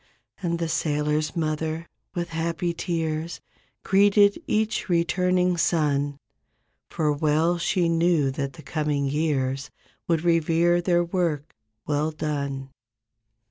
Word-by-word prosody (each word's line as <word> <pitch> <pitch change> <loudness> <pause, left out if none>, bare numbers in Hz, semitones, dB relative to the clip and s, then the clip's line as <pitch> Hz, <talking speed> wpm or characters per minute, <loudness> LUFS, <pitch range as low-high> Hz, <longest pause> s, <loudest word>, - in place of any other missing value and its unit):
And 170 -2 -1
the 170 0 -2
sailors' 150 -1 0
mother, 160 0 -2 0.3
with 175 -1 -2
happy 170 +1 -2
tears 165 -1 -2 0.4
Greeted 200 +1 +4
each 215 -1 0
returning 180 +1 +2
son 145 -4 +1 0.7
For 155 -2 0
well 155 +4 +1
she 175 0 +1
knew 165 -4 +2
that 140 0 -3
the 155 - -12
coming 145 0 -1
years 135 -2 -1 0.4
Would 165 -2 +1
revere 170 +1 +3
their 175 -1 +2
work, 170 -4 -2 0.3
well 150 +1 0
done. 140 -3 -3
160 Hz, 110 wpm, -25 LUFS, 150-175 Hz, 0.7 s, Greeted